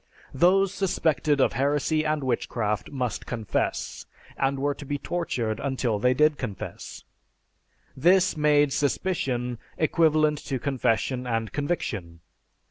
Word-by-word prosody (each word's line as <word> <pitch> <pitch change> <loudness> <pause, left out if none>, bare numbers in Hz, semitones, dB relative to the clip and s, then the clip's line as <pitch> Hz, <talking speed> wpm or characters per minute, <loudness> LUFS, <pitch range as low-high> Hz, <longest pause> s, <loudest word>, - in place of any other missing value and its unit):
Those 185 +6 +3
suspected 160 -7 +1
of - - +3
heresy 145 +4 +1
and 155 -2 -1
witchcraft 115 -4 -1
must 125 -5 -3
confess; 115 -5 -2 0.3
they 135 - +2
were 140 +1 -1
to 145 - -10
be 145 +1 -3
tortured 125 -10 -2
until 130 -6 -1
they 125 +4 +3
did 150 +1 +3
confess. 105 -7 -6 0.9
This 180 +6 +4
made 150 -2 +3
suspicion 130 -6 -1 0.2
equivalent 155 -2 +3
to 135 - -2
confession 125 -1 0
and 115 -2 -1
conviction. 105 - -3
140 Hz, 120 wpm, -26 LUFS, 125-155 Hz, 0.9 s, This